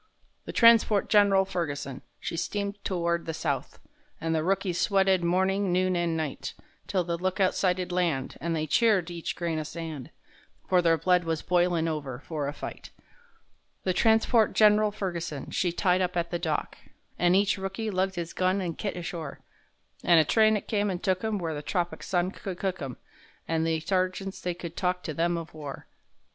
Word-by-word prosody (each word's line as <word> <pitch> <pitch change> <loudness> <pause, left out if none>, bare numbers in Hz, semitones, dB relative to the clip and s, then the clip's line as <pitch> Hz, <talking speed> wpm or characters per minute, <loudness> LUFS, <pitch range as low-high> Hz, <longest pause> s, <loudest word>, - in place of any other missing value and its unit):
The - - -5
transport 230 -3 +5
Gen'ral 200 -2 +5
Ferguson, 145 -8 -4 0.2
she - - -4
steamed 200 +3 -3
to 185 - -1
ward 170 0 0
the 160 - -3
south, 145 -4 -3 0.4
And 165 0 -1
the 160 -1 +1
rookies 185 -1 0
sweated 190 -2 +3
morning, 190 +2 +1
noon 185 +1 +2
and 170 -2 0
night; 155 -4 -4 0.3
'Till 185 -2 +1
the 170 0 -3
lookout 185 +1 +1
sighted 180 -1 0
land, 170 -7 0
and 165 +2 -1
they 155 -1 -1
cheered 185 +1 +2
each 170 -1 -4
grain 170 -2 -2
o' - - -2
sand,— 155 -4 -6 0.6
For 180 -1 +4
their 165 -1 +3
blood 180 +2 +3
was 165 -1 -2
boilin' 175 -2 +2
over 145 -6 -3
for 150 -1 -4
a - - -1
fight. - - -8 0.9
The 185 - +1
transport 220 +2 +3
Gen'ral 210 0 +5
Ferguson, 175 -8 -4
she 180 - +1
tied 180 +1 +2
up 180 0 -1
at 170 0 -1
the 175 - -1
dock, 160 -3 -2 0.4
An' 175 +1 +4
each 200 0 +2
rookie 195 +3 -3
lugged 190 0 0
his 170 -1 -4
gun 185 +1 +1
an' 175 -3 -2
kit 200 +2 -4
ashore, 165 -4 -6 0.6
An' 170 -1 +5
a 160 - +6
train 220 +4 +4
it - - -8
come 205 -2 +1
and 180 -1 -4
took 185 -1 +1
'em 220 -1 0
where 165 -4 -3
the 145 - -4
tropic 170 +4 -2
sun 180 0 0
could 190 -3 -6
cook 185 -2 -2
'em,— 135 -3 -5 0.5
An' 160 0 0
the 160 -1 +1
sergeants 185 +2 -1
they 180 -1 -2
could 170 -1 -7
talk 180 -1 -1
to 155 - -4
them 170 +3 +1
of 165 -2 -7
war. 150 -3 -8
180 Hz, 190 wpm, -28 LUFS, 165-195 Hz, 0.9 s, a